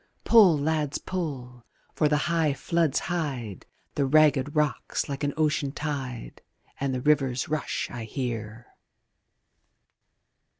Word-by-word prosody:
Pull, 205 -9 +6
lads, 150 0 -1
pull! 130 -9 -5 0.3
for 150 - +2
the 150 - +3
high 165 -4 +1
floods 165 -4 0
hide 135 - -4 0.3
The 140 -2 0
ragged 145 -1 +3
rocks 150 -2 0
like 140 0 -5
an 145 - +1
ocean 150 -2 +1
tide, 135 -5 -5 0.4
And 140 -1 -1
the 130 -1 -2
river's 135 -3 +1
rush 155 -1 -2
I 120 -2 -6
hear. 115 -2 -5
145 Hz, 120 wpm, -26 LUFS, 130-155 Hz, 0.4 s, Pull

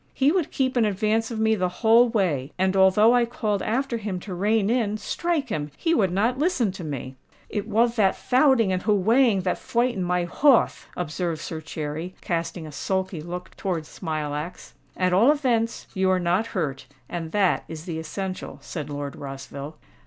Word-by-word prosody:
"He 275 +2 +3
would 355 -3 0
keep 260 -1 -1
in 240 - +4
advance 215 +2 +1
of 230 -2 -4
me 220 0 +3
the 185 -4 0
whole 225 +6 +4
way; 165 - 0
and 190 +1 +1
although 195 +4 +5
I 245 -1 +4
called 215 -4 -2
after 250 +2 -1
him 200 -4 -4
to 190 - -7
rein 205 +3 +1
in—strike 245 - -1
him!—he 150 - -2
would 200 - +3
not 230 +7 +1
listen 295 - +1
to 185 -1 -8
me." 135 -3 -6 0.3
"It 205 -1 -3
wath 230 +2 +2
that 195 -3 +3
thouting 255 -5 +3
and 185 0 0
hoowaying 215 +1 +3
that 180 - 0
fwightened 240 -3 0
my 180 0 0
horth," 270 - +3
observed 170 -1 -2
Sir 160 -1 -5
Cherry, 160 +3 -5
casting 170 -1 -3
a 155 - -8
sulky 190 +3 -2
look 175 +2 -7
towards 175 -6 -3
Smilax. 155 0 -5 0.2
"At 185 -1 +1
all 225 +10 +6
events 240 -6 0
you 190 0 +1
are 185 0 +3
not 180 +5 +1
hurt—and 145 +1 -5
that 200 -3 +2
is 160 0 -8
the 165 -3 -4
essential," 185 +4 -5
said 150 -4 -6
Lord 145 -1 -5
Rossville. 140 +2 -7
190 Hz, 175 wpm, -25 LUFS, 165-230 Hz, 0.3 s, all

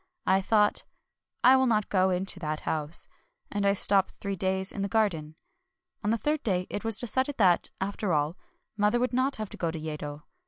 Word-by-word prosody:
I 190 +1 +3
thought, 210 +1 +2 0.3
" - - -45
I 260 - +8
will 260 0 +3
not 215 -3 +1
go 190 -1 +3
into 185 +1 -2
that 155 -2 -3
house; 155 +1 -2 0.2
" - - -46
and 205 -1 0
I 200 - +4
stopped 195 -1 +2
three 200 -1 -4
days 190 +1 0
in 200 - -5
the 200 - 0
garden. 180 -9 0 0.7
On 205 - 0
the 230 - +2
third 300 +5 -1
day 185 -4 0
it 205 - -3
was 225 -2 +3
decided 260 +4 0
that, 185 -5 +3
after 200 0 -2
all, 150 +1 +1 0.4
mother 210 +3 +2
would 250 +1 0
not 260 +3 +1
have 215 -2 -3
to - - -9
go 170 - -1
to 160 - -4
Yedo. 150 -1 -6
200 Hz, 210 wpm, -28 LUFS, 180-220 Hz, 0.7 s, I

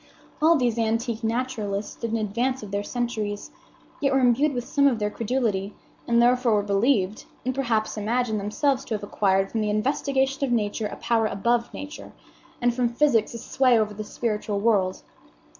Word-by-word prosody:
All 325 +2 +6
these 240 -5 +1
antique 230 0 -1
naturalists 225 -4 -2
stood 230 - -5
in 225 - 0
advance 235 +4 -1
of 205 - -8
their 200 0 -1
centuries, 215 -3 -3 0.5
yet 275 -2 +1
were 270 - +3
imbued 260 +4 +3
with 245 - -2
some 280 0 +3
of 255 -4 +2
their 210 -1 -1
credulity, 215 -5 -1 0.3
and 235 0 +3
therefore 245 -1 +4
were 205 - +1
believed, 205 0 +1 0.2
and 255 - 0
perhaps 230 -5 -1
imagined 220 0 0
themselves 265 +7 0
to 225 - -2
have 210 - -6
acquired 195 -1 +1
from 225 - -1
the 210 - 0
investigation 270 +4 0
of 270 - 0
Nature 215 -1 0
a - - -7
power 225 -2 +1
above 235 +4 0
Nature, 290 +2 -8 0.5
and 245 0 +2
from 245 0 +1
physics 235 -3 +2
a - - -3
sway 250 +1 +2
over 215 -1 0
the 215 +1 -5
spiritual 210 -2 -2
world. 200 -4 +1
230 Hz, 180 wpm, -25 LUFS, 210-250 Hz, 0.5 s, All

